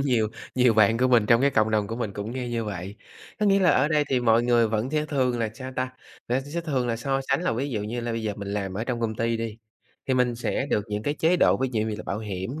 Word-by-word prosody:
nhiều 120 -6 +1 0.3
nhiều 125 -3 +4
bạn 110 +1 +4
của 130 0 +3
mình 115 -4 +4
trong 115 +2 +5
cái 140 +1 +4
cộng 110 -3 +2
đồng 105 -2 +1
của 115 - -5
mình 110 -5 -3
cũng 105 +3 -5
nghe 125 -1 -4
như 115 -1 -2
vậy. 100 0 -6 0.4
Có 210 - +3
nghĩa 195 0 +5
là 180 - +5
ở 135 +3 +3
đây 150 -1 +2
thì 130 -2 +2
mọi 115 0 +4
người 120 -2 +3
vẫn 110 +4 -1
sẽ 150 0 0
thường 130 -5 0
là 115 -2 -1
sao 130 +1 -7
ta, 130 0 -1 0.4
là 125 +2 +1
sẽ 145 +5 -4
thường 135 -7 -1
là 115 - 0
so 135 +3 -1
sánh - - +1
là - - +1
ví 135 +5 -2
dụ 105 -4 -2
như 115 +3 -3
là 120 0 -3
bây 115 0 -3
giờ 105 -1 -1
mình 100 -1 -6
làm 100 -2 -3
ở 110 +4 -2
trong 120 -2 -3
công 110 -1 -1
ty 115 +1 0
đi, 115 -1 -4 0.5
thì 130 - +3
mình 125 -1 +2
sẽ 120 +3 -2
được 105 - +1
những 105 0 -3
cái 145 +5 -1
chế 165 +4 +2
độ - - +4
ví 130 0 -1
dụ 110 - 0
như 110 -1 -2
là - - -7
bảo 100 - -2
hiểm 105 +7 -5
120 Hz, 300 wpm, -25 LUFS, 110-130 Hz, 0.5 s, trong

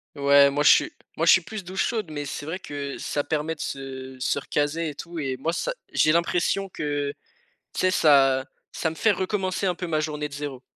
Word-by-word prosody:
Ouais 140 0 +6
moi 145 +1 0
je - - +7
suis, - - +4 0.2
moi 165 - 0
je - - +8
suis 190 - +6
plus 195 +4 -7
douche 185 +2 -1
chaude, 215 -8 -2
mais 145 -1 -5
c'est 145 +1 -5
vrai 170 +5 -4
que 140 -4 -6
ça 145 - -2
permet 155 +1 -1
de - - -28
se 130 -1 -6
se 130 - 0
recaser 150 +3 -1
et 145 - -8
tout 170 +3 -7
et 135 -3 -2
moi 165 +5 -2
ça, - - -2 0.2
j'ai 155 - +3
l'impression 175 +3 +1
que, 145 -4 -2 0.6
tu - - -5
sais, 185 - +3
ça, 135 -6 +4 0.3
ça 160 - -1
me 160 - -8
fait 220 +5 +3
recommencer 190 0 -1
un 180 - 0
peu 180 - -5
ma 155 -3 0
journée 150 -1 -3
de 140 - -13
0. 140 -3 -5
150 Hz, 230 wpm, -25 LUFS, 140-175 Hz, 0.6 s, je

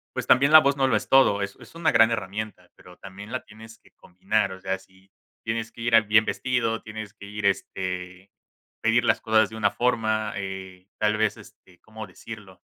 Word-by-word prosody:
pues, - - -3
también 140 +4 +4
la 155 - +11
voz 140 -1 +1
no 135 -1 +2
lo 115 -5 +2
es - - -4
todo, 115 -7 +4
es 100 0 -5
es - - -15
una 165 -1 +1
gran 115 +1 +5
herramienta, 105 -3 -5
pero 90 0 -17
también, 100 +3 -11
la 130 - -4
tienes 110 +1 -14
que - - -25
combinar, 100 +2 -2
o 95 - -10
sea, 95 0 -2
si 95 0 -24 0.3
tienes 110 0 -3
que 115 - -11
ir, 120 -1 0
ah, 115 - +9
bien 110 0 +3
vestido, 115 -3 -1
tienes 110 -2 -8
que 100 - -12
ir, 105 0 -4
este, 90 -1 -3 0.5
pedir 115 +1 +2
las - - +2
cosas 110 0 +2
de 110 - -9
una 100 -2 +2
forma, 110 -3 0
eh, 95 -1 -7
tal 105 0 +1
vez, 110 0 0
este, 90 -2 -18
cómo 110 -1 -10
decirlo. 100 -5 -12
110 Hz, 205 wpm, -25 LUFS, 95-115 Hz, 0.5 s, la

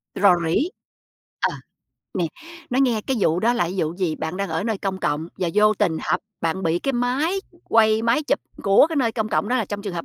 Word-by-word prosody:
Rò 195 -3 +5
rỉ. 255 - +1 0.7
Ờ, - - +1 0.6
nè, 180 -3 0 0.5
nói 255 +2 +2
nghe 240 -5 +2
cái 265 - 0
vụ 165 -1 +2
đó 235 +4 +3
là 215 -8 0
vụ 160 -3 -1
gì? 175 -5 -1
Bạn 160 +3 -4
đang 200 0 -2
ở 160 +5 -1
nơi 220 -4 -1
công 190 -1 -3
cộng 150 +3 -1
và 180 - 0
vô 215 +1 +5
tình 185 -6 +1
họp - - 0 0.2
bạn 165 +3 -1
bị 165 +1 +1
cái 275 - -1
máy 265 +10 0 0.2
quay, 220 -1 +3
máy 235 +6 +2
chụp - - +1 0.2
của 200 +7 +6
cái 325 - -3
nơi 235 -5 +2
công 220 -2 -2
cộng, 205 - 0
đó 255 - +2
là 225 - +1
trong 205 +1 -5
trường 200 -3 -5
hợp 170 - -4
205 Hz, 235 wpm, -23 LUFS, 175-240 Hz, 0.7 s, của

